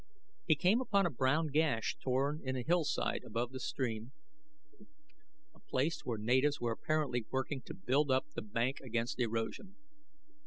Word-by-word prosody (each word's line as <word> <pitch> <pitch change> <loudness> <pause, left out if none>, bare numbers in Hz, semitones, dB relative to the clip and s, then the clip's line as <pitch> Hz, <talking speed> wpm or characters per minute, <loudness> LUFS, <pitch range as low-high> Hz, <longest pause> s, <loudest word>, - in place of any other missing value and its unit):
He - - +6
came 190 - +3
upon 200 -6 +2
a 175 - +1
brown 145 +5 +2
gash 145 -7 +1
torn 135 +4 0
in 130 0 -2
a 125 - -2
hillside 165 -5 +1
above 120 +1 -2
the 130 - -6
stream, 120 -2 -3 1.4
a - - -21
place 145 +3 -1
where 120 -3 -2
natives 130 +7 +2
were 120 -1 0
apparently 125 -2 -1
working 130 +1 -2
to - - -6
build 140 +3 +1
up 130 0 +3
the - - -3
bank 115 +5 -1
against 120 -1 -2
erosion. 115 - -2
130 Hz, 155 wpm, -34 LUFS, 120-150 Hz, 1.4 s, He